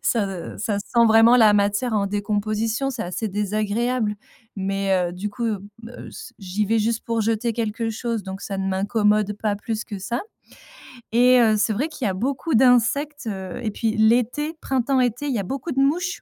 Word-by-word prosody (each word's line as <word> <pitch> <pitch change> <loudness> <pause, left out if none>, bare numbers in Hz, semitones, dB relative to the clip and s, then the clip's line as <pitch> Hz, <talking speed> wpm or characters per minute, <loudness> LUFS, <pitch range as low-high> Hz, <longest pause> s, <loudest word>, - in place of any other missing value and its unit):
Ça 195 -7 -1
ça 205 -1 -1
sent 235 +3 +2
vraiment 225 +2 +6
la 220 -3 +6
matière 205 +4 +1
en 200 -2 +1
décomposition, 215 +5 -1
c'est 245 -4 -4
assez 185 +5 -3
désagréable. 210 +3 -1 0.4
Mais, 195 0 -1 0.2
heu, - - -10
du 195 +4 -4
coup, 235 +4 -5
heu, 210 -4 -2 0.5
s - - -10
j'y 195 +2 -2
vais 225 +2 +2
juste 225 +1 -1
pour 230 -1 -1
jeter 225 +2 0
quelque 225 0 -2
chose, 230 0 -3
donc 190 0 -7
ça 195 -1 -4
ne 190 - -2
m'incommode 210 +1 +1
pas 210 -2 +1
plus 220 +2 -4
que 205 -3 -7
ça 235 +7 -3 0.9
et 250 +2 +5
heu, 220 -2 +4
c'est 215 +1 +1
vrai 280 +10 -1
qu'il 280 -5 -5
y - - +1
a - - -2
beaucoup 270 - -1
d'insectes, 260 +4 +3
heu 190 0 -5
et 215 - -1
puis 220 +2 -2
l'été, 245 +8 +2
printemps-été, 255 0 0
il 275 - -1
y - - 0
a - - -2
beaucoup 270 - -4
de 270 - -1
mouches 350 +6 0
220 Hz, 190 wpm, -23 LUFS, 205-245 Hz, 0.9 s, vraiment